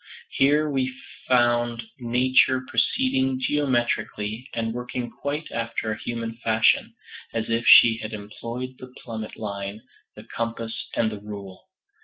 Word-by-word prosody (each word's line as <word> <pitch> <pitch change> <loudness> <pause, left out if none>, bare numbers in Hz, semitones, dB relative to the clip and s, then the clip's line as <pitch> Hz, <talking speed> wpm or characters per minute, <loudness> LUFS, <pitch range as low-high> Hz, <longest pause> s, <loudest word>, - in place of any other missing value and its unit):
Here 150 +3 +3
we 135 -3 0 0.4
found 120 -1 +2 0.2
Nature 130 +2 +3
proceeding 130 - +1
geometrically, 120 -4 -1
and 115 -1 -1
working 125 0 -4
quite 150 +2 -4
after 115 -1 -2
a 110 - -4
human 115 -1 -4
fashion, 110 -1 +2 0.4
as 115 0 -1
if 115 +1 0
she 115 -2 +9
had 110 -1 -6
employed 115 +4 -6
the 130 0 -10
plummet 110 -2 -6
line, 100 0 -5 0.3
the - - -10
compass 115 -1 -4
and 110 -1 +1
the 105 - -6
rule. 100 - -9
115 Hz, 130 wpm, -25 LUFS, 110-130 Hz, 0.4 s, she